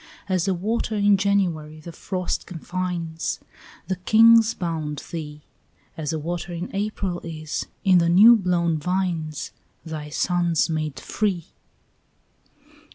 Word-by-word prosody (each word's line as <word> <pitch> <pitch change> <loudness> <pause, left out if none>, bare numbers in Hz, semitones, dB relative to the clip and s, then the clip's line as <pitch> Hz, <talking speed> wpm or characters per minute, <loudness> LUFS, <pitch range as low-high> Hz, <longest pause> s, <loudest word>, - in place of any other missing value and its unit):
As 185 -2 0
a 190 - +2
water 220 +4 -1
in 205 -1 +4
January 180 -6 0
the 170 +2 -9
frost 185 +2 -3
confines, 175 -1 -3 0.5
Thy 185 - -1
kings 225 +2 +6
bound 160 -4 -3
thee; 150 -3 -6 0.5
As 150 -2 -3
a 160 - -1
water 175 +3 -4
in 175 +3 -5
April 195 -3 -2
is, 155 -2 -5 0.2
in 185 -3 +5
the 170 0 +2
new 210 +7 +8
blown 175 -5 +1
vines, 170 -3 -2 0.3
Thy 155 -2 -6
sons 170 0 +1
made 155 -2 -2
free. 195 -6 -2
175 Hz, 125 wpm, -24 LUFS, 160-195 Hz, 0.5 s, new